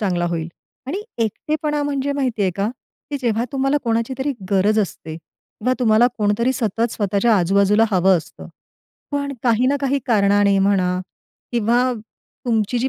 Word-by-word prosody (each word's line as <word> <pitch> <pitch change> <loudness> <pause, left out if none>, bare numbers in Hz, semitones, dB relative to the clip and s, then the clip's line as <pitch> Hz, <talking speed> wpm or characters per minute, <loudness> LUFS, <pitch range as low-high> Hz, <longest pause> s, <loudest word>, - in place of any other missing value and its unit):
चांगला 180 -4 0
होईल. 165 -1 -3 0.4
आणि 375 +9 -3 0.2
एकटेपणा 300 - -2
म्हणजे 285 -1 -1
माहिती 255 -7 -1
आहे 190 - +2
का, 200 +2 0 0.4
की 285 - -1
जेव्हा 235 -1 0
तुम्हाला 270 +1 +1
कोणाची 230 +2 0
तरी 280 +2 -1 0.2
गरज 205 +2 +3
असते 160 -5 -5
किंवा 215 +8 -5
तुम्हाला 230 -1 +4
कोणतरी 210 +5 +1
सतत 230 -1 -1
स्वतःच्या 205 +2 +2
आजूबाजूला 200 +4 +3
हवं 190 -1 +4
असतं. 160 - -11 0.6
पण 280 -1 -2
काही 240 0 +2
ना 280 +2 +2
काही 275 0 +1
कारणाने 200 -3 +3
म्हणा 185 -2 +2 0.5
किंवा 235 +1 +2 0.6
तुमची 225 0 +1
जी 255 +3 0
225 Hz, 150 wpm, -20 LUFS, 200-260 Hz, 0.6 s, तुम्हाला